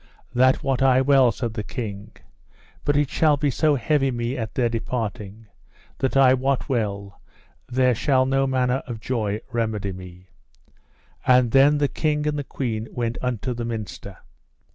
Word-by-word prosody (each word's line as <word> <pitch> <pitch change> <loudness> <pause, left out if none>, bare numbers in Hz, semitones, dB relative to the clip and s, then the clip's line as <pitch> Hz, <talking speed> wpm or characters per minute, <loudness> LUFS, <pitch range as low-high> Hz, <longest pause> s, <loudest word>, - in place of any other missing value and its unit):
That 130 +1 +3
wot 135 -1 0
I 130 -1 +5
well, 135 -2 +4
said 115 +1 -4
the 110 - -3
king, 105 -2 -6 0.7
but 145 0 +2
it 145 -1 +2
shall 150 -3 +2
so 150 +3 +2
heavy 135 +1 +1
me 120 0 -2
at 110 -4 -5
their 125 -2 +2
departing 110 -2 -4 0.5
that 135 0 0
I 130 -1 +6
wot 135 +1 0
well 100 -6 -3 0.5
there 125 0 +2
shall 130 +2 +2
no 135 +1 +1
manner 130 0 0
of 120 -3 -6
joy 110 -3 -2
remedy 110 -4 -2
me. 90 0 -12 1.0
And 125 -2 +4
then 140 +3 +5
the 145 -1 +2
king 150 0 -1
and 150 -1 -1
the - - -3
queen 115 -5 -4
went 120 -1 -3
unto 125 0 -2
the 120 0 -5
minster. 105 -4 -6
125 Hz, 160 wpm, -23 LUFS, 110-135 Hz, 1.0 s, I